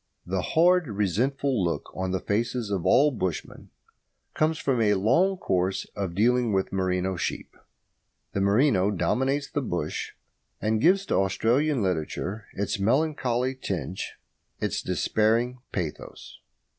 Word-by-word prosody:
The 95 +1 -1
hard, 175 - +3
resentful 115 +4 0
look 85 - -2
on 95 0 -2
the 95 0 -1
faces 115 +2 -1
of 95 -5 -1
all 145 +3 +5
bushmen 95 - -4 0.6
comes 155 +1 +1
from 130 -5 0
a 105 -2 +3
long 165 - +3
course 95 - 0
of 95 -4 -3
dealing 120 +3 +3
with 95 -1 0
merino 95 -1 0
sheep. - - -4 0.8
The 100 - 0
merino 100 -1 +3
dominates 130 +10 0
the 145 - -1
bush, 85 - -3 0.5
and 110 0 0
gives 195 +6 +4
to - - 0
Australian 120 +7 +1
literature 95 +4 -3
its 100 0 -2
melancholy 130 +1 +1
tinge, 95 - -4 0.4
its - - -1
despairing 115 +4 +1
pathos. 80 -8 -6
110 Hz, 130 wpm, -26 LUFS, 95-130 Hz, 0.8 s, all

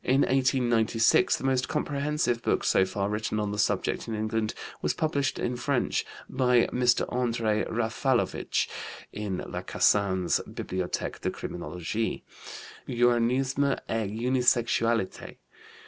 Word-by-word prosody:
In 135 +2 +3
1896 120 -4 +3
the - - -9
most 130 -1 +1
comprehensive 140 -4 -1
book - - 0
so 95 - +3
far 100 +1 -2
written 105 +1 -2
on 105 -1 -1
the 105 - -4
subject - - 0
in 115 - -3
England 110 0 -1 0.3
was - - 0
published 145 -3 0
in 125 - -2
French 130 +1 0 0.2
by 125 -2 +3
Mr. 125 -1 +2
André 115 -3 0
Raffalovich 120 +2 0 0.5
(in 105 -3 -3
Lacassagne's 95 -3 +1
Bibliothèque 90 -1 -4
de - - 0
Criminologie), 90 +6 -4 0.6
Uranisme 125 +3 +2
et 110 -3 -1
Unisexualité. 115 -2 +1
120 Hz, 115 wpm, -27 LUFS, 110-130 Hz, 0.6 s, In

